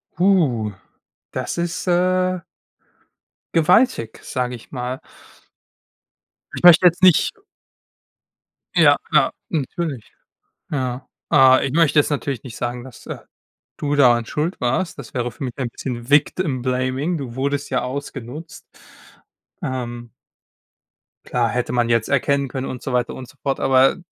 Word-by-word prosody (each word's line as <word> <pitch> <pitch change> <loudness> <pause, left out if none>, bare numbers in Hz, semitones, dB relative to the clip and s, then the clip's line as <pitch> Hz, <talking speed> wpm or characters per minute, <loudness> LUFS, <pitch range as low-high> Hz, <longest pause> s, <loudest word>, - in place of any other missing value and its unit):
Puh. 155 - +2 0.6
Das - - -4
ist, 170 +1 -3
äh, 185 +1 +2 1.1
gewaltig, 170 - +3
sage 125 -1 -3
ich 115 - -14
mal. 125 0 -4 1.6
Ich - - -7
möchte 175 0 +8
jetzt 175 +1 +4
nicht 180 -5 +6 1.5
Ja, - - +6
klar, - - +4 0.2
natürlich, 150 -3 -3 0.6
ja. 130 -2 -3 0.2
Ah, 130 0 +6
ich 135 - -1
möchte 160 -1 +3
jetzt 150 - +3
natürlich 140 -4 -2
nicht 125 -4 -9
sagen, 120 0 -4
dass 130 -3 -13
äh, - - -5 0.6
du 145 -1 -1
daran 120 -4 +5
schuld 155 +9 -2
warst. 150 +8 -1
Das 130 -5 -9
wäre 125 -1 -1
für 125 - -8
mich 125 - -3
ein 130 -3 -1
bisschen 120 -1 -6
Victim-Blaming. 135 0 +1
Du 130 -5 -6
wurdest 140 +2 -1
ja 130 - 0
ausgenutzt. 140 +3 -7 1.0
Ähm. 120 -3 -5 1.1
Klar, 120 -2 0
hätte 125 +2 -2
man 120 -1 +1
jetzt 115 -2 +2
erkennen 140 0 +1
können 130 +1 -4
und 125 - -6
so 135 - -4
weiter 125 -1 0
und 130 - -8
so 145 - -18
fort, 135 -1 -1
aber 135 0 +4
130 Hz, 135 wpm, -21 LUFS, 125-155 Hz, 1.6 s, möchte